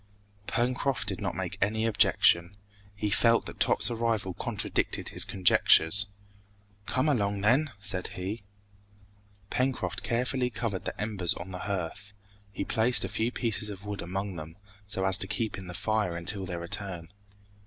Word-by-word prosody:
Pencroft 125 Hz, 0 st, -1 dB
did 95 Hz, -2 st, -3 dB
not -, -, -3 dB
make -, -, -5 dB
any 110 Hz, +3 st, +1 dB
objection. 100 Hz, -4 st, +3 dB, 0.4 s
He 105 Hz, +1 st, -2 dB
felt 115 Hz, +2 st, +4 dB
that -, -, -8 dB
Top's -, -, +5 dB
arrival 115 Hz, -5 st, -1 dB
contradicted -, -, -1 dB
his -, -, +4 dB
conjectures. 95 Hz, 0 st, +4 dB, 0.8 s
"Come 130 Hz, +4 st, 0 dB
along 100 Hz, -8 st, 0 dB
then!" 130 Hz, +8 st, +2 dB
said 95 Hz, -2 st, -3 dB
he. 95 Hz, +4 st, -5 dB, 1.1 s
Pencroft 130 Hz, +1 st, -1 dB
carefully 125 Hz, +1 st, -1 dB
covered 110 Hz, -4 st, -4 dB
the -, -, -5 dB
embers 105 Hz, -5 st, +1 dB
on 95 Hz, -, -8 dB
the 90 Hz, -, -6 dB
hearth. 95 Hz, +1 st, -4 dB, 0.4 s
He 100 Hz, -, -4 dB
placed 115 Hz, -1 st, +4 dB
a -, -, -4 dB
few 110 Hz, +4 st, -1 dB
pieces 110 Hz, -4 st, -1 dB
of 100 Hz, -1 st, -9 dB
wood 105 Hz, -1 st, -5 dB
among 95 Hz, +1 st, -4 dB
them, 80 Hz, +2 st, -9 dB, 0.3 s
so 95 Hz, -2 st, -2 dB
as 95 Hz, 0 st, +7 dB
to 95 Hz, -, +1 dB
keep 110 Hz, +1 st, -2 dB
in 95 Hz, -2 st, -9 dB
the 90 Hz, -, -7 dB
fire 110 Hz, -5 st, -1 dB
until 95 Hz, +3 st, +2 dB
their 85 Hz, -1 st, -5 dB
return. 85 Hz, -1 st, -5 dB
100 Hz, 155 wpm, -28 LUFS, 95-115 Hz, 1.1 s, as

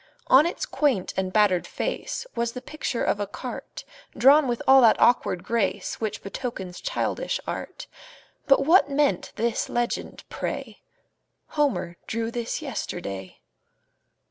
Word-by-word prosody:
On 285 Hz, +5 st, +6 dB
its 360 Hz, -, -3 dB
quaint 280 Hz, -, 0 dB
and 190 Hz, -1 st, -1 dB
battered 200 Hz, -4 st, +3 dB
face -, -, -3 dB
Was 235 Hz, 0 st, -1 dB
the 250 Hz, -, -5 dB
picture 280 Hz, -4 st, -3 dB
of 205 Hz, -, +1 dB
a 205 Hz, -, -2 dB
cart, -, -, -7 dB, 0.3 s
Drawn 280 Hz, +3 st, +6 dB
with 240 Hz, -1 st, -2 dB
all 265 Hz, 0 st, +8 dB
that 230 Hz, -3 st, +5 dB
awkward 205 Hz, -7 st, +3 dB
grace 230 Hz, -2 st, -1 dB
Which 215 Hz, -2 st, -3 dB
betokens 195 Hz, -4 st, -6 dB
childish -, -, -2 dB
art; -, -, -6 dB, 0.6 s
But 275 Hz, 0 st, +4 dB
what 330 Hz, -1 st, +5 dB
meant 280 Hz, -9 st, +1 dB
this 235 Hz, 0 st, -1 dB
legend, 240 Hz, 0 st, -2 dB
pray: -, -, -5 dB, 0.7 s
"Homer 190 Hz, -, 0 dB
drew 230 Hz, 0 st, -2 dB
this 240 Hz, +6 st, -3 dB
yesterday?" 100 Hz, -, -5 dB
235 Hz, 135 wpm, -25 LUFS, 195-275 Hz, 0.7 s, all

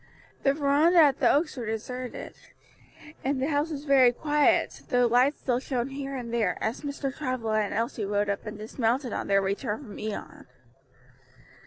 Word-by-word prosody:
The 275 Hz, -, +3 dB
veranda 300 Hz, +4 st, +3 dB
at 290 Hz, -5 st, +6 dB
the -, -, +4 dB
Oaks 305 Hz, +1 st, +1 dB
was 240 Hz, -4 st, -5 dB
deserted, 250 Hz, +3 st, -5 dB, 0.9 s
and 270 Hz, 0 st, 0 dB
the 270 Hz, +3 st, 0 dB
house 295 Hz, +1 st, 0 dB
very 270 Hz, -4 st, +5 dB
quiet, 295 Hz, +3 st, +1 dB
though 245 Hz, -2 st, +3 dB
lights 250 Hz, +5 st, +3 dB
still 245 Hz, -2 st, 0 dB
shone 255 Hz, -1 st, -2 dB
here 275 Hz, 0 st, -5 dB
and 240 Hz, -3 st, -5 dB
there, 220 Hz, -6 st, +1 dB
as 220 Hz, +2 st, -2 dB
Mr. 280 Hz, -2 st, -4 dB
Travilla 250 Hz, -6 st, -1 dB
and 210 Hz, -, -1 dB
Elsie 230 Hz, 0 st, -2 dB
rode 205 Hz, +1 st, 0 dB
up 200 Hz, +2 st, -3 dB
and 210 Hz, 0 st, -6 dB
dismounted 230 Hz, +3 st, -1 dB
on -, -, -3 dB
their 195 Hz, 0 st, +3 dB
return 210 Hz, +6 st, -2 dB
from 210 Hz, -6 st, -10 dB
Ion. 215 Hz, -1 st, -6 dB
250 Hz, 170 wpm, -27 LUFS, 220-280 Hz, 0.9 s, at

